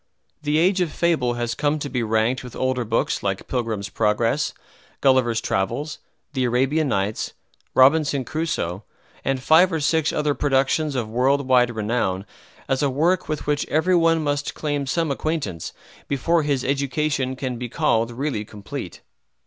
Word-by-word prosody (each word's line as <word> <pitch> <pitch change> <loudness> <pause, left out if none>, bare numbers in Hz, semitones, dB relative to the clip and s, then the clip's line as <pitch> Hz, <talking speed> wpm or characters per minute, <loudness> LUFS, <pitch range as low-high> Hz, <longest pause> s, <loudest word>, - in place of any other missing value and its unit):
"The 150 0 +1
Age 185 +3 +3
of 170 -4 0
Fable" 150 -8 +1
has 120 0 -2
come 145 +4 0
to 145 - -4
be 125 -3 -2
ranked 110 +3 +1
with 125 - -9
older 130 -1 0
books 115 +1 0
like 95 -1 -2
"Pilgrim's 115 -5 -2
Progress," 115 +8 +1 0.5
"Gulliver's 130 -4 +3
Travels," 140 +11 -2 0.3
"The 130 -3 0
Arabian 135 +6 +1
Nights," 100 -3 -1 0.4
"Robinson 140 0 +4
Crusoe," 115 - -2 0.4
and 135 -1 0
five 170 +6 +6
or 165 - 0
six 155 +1 +2
other 150 -1 0
productions 140 +2 +1
of 120 -4 -1
world 130 +4 +1
wide 125 -2 +4
renown 105 -3 -1 0.4
as 135 -1 0
a 145 - +2
work 165 +8 +1
with 155 -1 -3
which 145 0 0
every 175 +4 +2
one 165 -2 +3
must 145 -1 -1
claim 145 -2 -2
some 165 +1 0
acquaintance 140 - -3 0.4
before 165 +5 +1
his 140 -3 -1
education 140 -1 0
can 130 -2 -4
be 125 -1 -4
called 115 +1 +1
really 120 -2 -2
complete. 105 -1 -8
135 Hz, 155 wpm, -23 LUFS, 120-150 Hz, 0.5 s, five